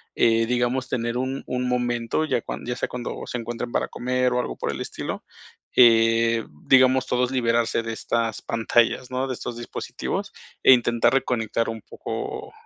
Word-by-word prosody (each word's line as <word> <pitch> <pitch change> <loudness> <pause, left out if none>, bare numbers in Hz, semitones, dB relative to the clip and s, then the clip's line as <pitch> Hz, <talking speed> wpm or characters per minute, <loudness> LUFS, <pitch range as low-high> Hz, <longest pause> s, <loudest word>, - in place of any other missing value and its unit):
eh, 115 0 +3
digamos 125 +2 0
tener 120 -1 -1
un 130 +1 -2
un 125 0 -1
momento 120 +3 0
ya 125 -6 0
cuan - - -6
ya 125 +1 -2
sea - - -3
cuando 125 -1 -5
se 125 - -4
encuentren 120 +1 -5
para - - 0
comer 125 0 0
o 125 - +1
algo - - -3
por - - -3
el - - -5
estilo, - - -5 0.5
eh, 115 -1 +5 0.2
digamos 130 0 +5
todos 125 +1 +1
liberarse 115 -2 +1
de 115 0 -4
estas 115 -1 -2
pantallas, 115 +2 +1
¿no?, 130 +1 -1
de 130 - -2
estos 120 -1 -6
dispositivos 120 - -5 0.3
e 130 - +8
intentar 120 0 +3
reconectar 115 -4 0
un 110 -1 -5
poco - - -6
120 Hz, 170 wpm, -24 LUFS, 115-125 Hz, 0.5 s, e